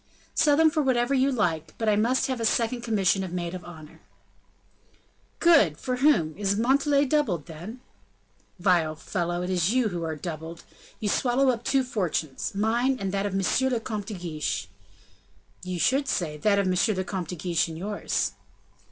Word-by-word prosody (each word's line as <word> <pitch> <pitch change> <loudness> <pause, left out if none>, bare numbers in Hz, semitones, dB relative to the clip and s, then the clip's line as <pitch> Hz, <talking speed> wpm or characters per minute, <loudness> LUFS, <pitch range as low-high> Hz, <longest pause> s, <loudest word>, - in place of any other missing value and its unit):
"Sell 290 -2 +3
them 320 0 +5
for 305 - +1
whatever 255 -1 +1
you 270 +1 +3
like, 165 - -1
but 225 - -2
I 210 - +4
must 235 +5 +2
have 260 -2 -2
a - - -2
second 235 +2 +1
commission 200 -4 +1
of 185 - -6
maid 175 -1 -3
of 180 -1 -7
honor." 155 -3 -12 1.4
"Good! 215 - +5
for 250 +6 -3
whom? 215 - +3
Is 200 0 0
Montalais 280 +4 +3
doubled, 250 - 0
then?" 180 +10 -9 0.8
"Vile 175 -4 +2
fellow! 175 +1 -3
It 180 - -3
is 180 +1 +1
you 250 -4 +2
who 175 -3 -4
are 160 -1 -3
doubled. 160 +1 -7 0.4
You 215 - -2
swallow 255 +5 +2
up 240 -2 -1
two 270 +1 +2
fortunes 180 - -3
mine, 235 +6 +1
and 195 -1 -2
that 200 +1 -1
of 195 - -4
M. 195 - +1 0.3
le 240 - +1
Comte 215 -3 -5
de 220 - -5
Guiche." 165 -4 -3 1.0
"You 185 -1 -4
should 270 - +2
say, 160 -5 -1
that 200 +7 +2
of 200 - +2
M. 185 +4 +2
le 190 - 0
Comte 185 -3 -4
de 180 - -4
Guiche 170 0 0
and 160 -1 -7
yours." 205 +4 -2
200 Hz, 185 wpm, -26 LUFS, 175-245 Hz, 1.4 s, them